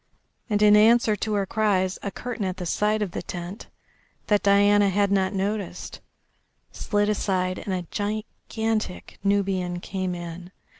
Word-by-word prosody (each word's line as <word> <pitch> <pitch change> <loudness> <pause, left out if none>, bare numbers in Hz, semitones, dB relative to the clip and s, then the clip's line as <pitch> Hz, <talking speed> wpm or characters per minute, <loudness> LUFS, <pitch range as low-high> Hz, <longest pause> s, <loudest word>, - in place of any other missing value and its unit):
And, 210 -1 +2
in 210 0 +7
answer 220 0 +5
to 215 0 -2
her 200 -1 +1
cries, 190 -3 0
a 200 - -3
curtain 245 +1 -5
at 185 -1 -2
the 180 - -5
side 210 +4 +1
of 195 - -4
the - - -4
tent, 175 +3 -7 0.6
that 205 -1 +2
Diana 205 0 +4
had 200 +1 +1
not 190 -1 +2
noticed, 200 -2 -3 0.7
slid 205 0 0
aside 185 -3 0
and 200 - -5
a 180 -2 -2
gigantic 215 0 -3
Nubian 190 -3 0
came 185 0 -3
in. 175 +1 -8
200 Hz, 150 wpm, -25 LUFS, 185-210 Hz, 0.7 s, in